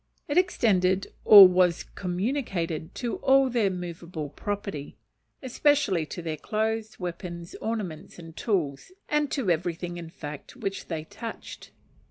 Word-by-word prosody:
It 290 - -2
extended 195 - +2
or 200 -3 +12
was 180 -1 +2
communicated 180 - -2
to 240 -2 -3
all 270 -1 +4
their 230 -5 +2
movable 170 -4 -6
property; 200 -2 -5 0.5
especially 255 - +2
to 175 - -7
their 160 -2 -3
clothes, 220 +4 -2
weapons, 175 -1 -6
ornaments, 195 -8 -4
and 165 -2 -11
tools, 170 - -2 0.2
and 300 -1 +1
to 245 -11 0
everything, 175 +1 -2
in 170 -1 -7
fact, 150 - -9
which 195 -6 -4
they 160 -3 -4
touched. 225 +8 -9
185 Hz, 130 wpm, -27 LUFS, 170-225 Hz, 0.5 s, or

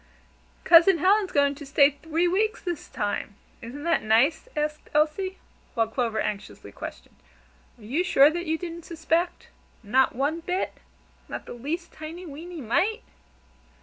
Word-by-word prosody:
"Cousin 340 +2 +7
Helen's 385 +3 +3
going 285 -1 +3
to 285 +1 -10
stay 280 0 +4
three 325 +4 -1
weeks 430 +5 +1
this 345 -4 -5
time 205 -1 -3 0.3
isn't 250 +5 -8
that 335 0 +2
nice?" 235 - +2
asked 300 0 -2
Elsie, 320 +6 +1 0.4
while 225 -2 +2
Clover 225 -1 -1
anxiously 205 -1 -5
questioned: - - -9 0.6
"Are 230 - -17
you 275 +12 0
sure 290 -4 +6
that 345 +1 -4
you 320 +1 +1
didn't 340 -1 -7
suspect? 335 +1 -1 0.3
Not 255 +5 +2
one 285 +6 0
bit? 360 +3 -2 0.6
Not - - -6
the - - -8
least 310 +8 -4
tiny, 325 +4 -8
weeny 330 +2 -8
mite?" 380 - 0
315 Hz, 150 wpm, -26 LUFS, 275-350 Hz, 0.6 s, Cousin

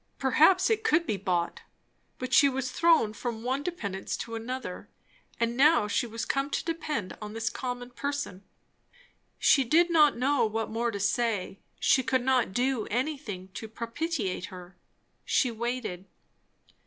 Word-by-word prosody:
perhaps 355 - +4
it 440 0 +1
could 340 -6 +3
be 215 - -1
bought. 180 -3 -1 0.6
But 255 - -5
she 280 - +7
was 260 -1 -3
thrown 325 -11 +3
from 225 0 -5
one 260 +3 -1
dependence 205 - -4
to 230 - -6
another; 230 -3 -5 0.5
and 235 0 0
now 280 -4 +5
she 210 +4 0
was 230 0 -4
come 275 +1 -1
to - - -2
depend 310 - -3
on 210 0 -6
this 225 0 -2
common 245 -1 -5
person. 280 -8 -4 0.9
She 275 - +4
did 340 +7 +3
not 300 -5 +5
know 275 +3 +2
what 220 +1 -3
more 235 +2 0
to 205 -3 -4
say; 205 -1 0 0.2
she 265 - +4
could 260 0 0
not 255 -5 +2
do 245 +1 0
anything 240 -7 -3
to 220 +3 -7
propitiate 230 - -3
her. 180 -1 -11 0.5
She 250 - +2
waited. 230 -5 -4
245 Hz, 155 wpm, -28 LUFS, 215-285 Hz, 0.9 s, she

